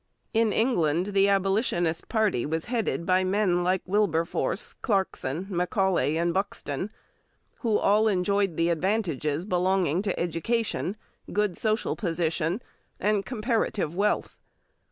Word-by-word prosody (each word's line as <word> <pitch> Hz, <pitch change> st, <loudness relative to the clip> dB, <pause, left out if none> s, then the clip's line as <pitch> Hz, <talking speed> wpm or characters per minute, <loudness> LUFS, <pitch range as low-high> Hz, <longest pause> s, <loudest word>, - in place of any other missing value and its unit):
In 225 Hz, -1 st, +3 dB
England 185 Hz, -, +1 dB
the 195 Hz, 0 st, +4 dB
Abolitionist 195 Hz, -4 st, +1 dB
party 215 Hz, -, +1 dB
was 160 Hz, +2 st, -2 dB
headed 230 Hz, -8 st, -1 dB
by 185 Hz, 0 st, +3 dB
men 185 Hz, -2 st, +1 dB
like 185 Hz, +1 st, +1 dB
Wilberforce, 185 Hz, -4 st, 0 dB
Clarkson, 190 Hz, -, -1 dB
Macaulay, 180 Hz, -3 st, +1 dB
and 170 Hz, +1 st, +1 dB
Buxton, 190 Hz, -3 st, -3 dB, 0.7 s
who 225 Hz, -4 st, +2 dB
all 210 Hz, +2 st, +3 dB
enjoyed 195 Hz, -2 st, +1 dB
the 165 Hz, +1 st, +2 dB
advantages 170 Hz, -, 0 dB
belonging 180 Hz, -3 st, +1 dB
to 200 Hz, -2 st, -2 dB
education, 200 Hz, +4 st, -1 dB, 0.3 s
good 210 Hz, -4 st, +1 dB
social 215 Hz, +3 st, 0 dB
position, 170 Hz, +1 st, -1 dB, 0.4 s
and 205 Hz, 0 st, +1 dB
comparative 220 Hz, -, -1 dB
wealth. 200 Hz, +4 st, 0 dB
190 Hz, 115 wpm, -27 LUFS, 170-210 Hz, 0.7 s, the